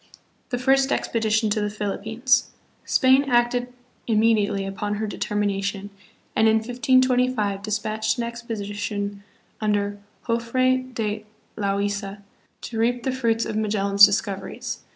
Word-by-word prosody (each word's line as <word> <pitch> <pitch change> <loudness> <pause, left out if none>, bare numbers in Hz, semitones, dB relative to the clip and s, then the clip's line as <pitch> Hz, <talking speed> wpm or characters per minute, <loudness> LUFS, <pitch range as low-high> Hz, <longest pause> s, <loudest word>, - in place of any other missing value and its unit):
The 245 - -1
First 270 +2 +3
Expedition 220 -1 +1
to 210 - +1
the 210 - 0
Philippines. 220 +5 0 0.4
Spain 260 +1 +4
acted 245 0 +2 0.4
immediately 215 -3 +2
upon 205 +2 -3
her 215 +1 -2
determination, 200 -1 -2 0.4
and 220 - +4
hi 220 - +5
1525 250 -3 +2
dis 210 +1 -1
patched 215 +2 -2
an 240 - -1
expedition 205 -3 -4 0.4
under 205 -1 0 0.3
Jofre 255 +2 +1
de 215 -1 -2 0.3
Loaisa 200 0 -2 0.4
to 225 - -5
reap 240 +1 +1
the 265 - 0
fruits 230 -3 0
of - - -4
Magellan's 200 -2 +2
discoveries. 200 -1 +2
220 Hz, 120 wpm, -24 LUFS, 205-240 Hz, 0.4 s, hi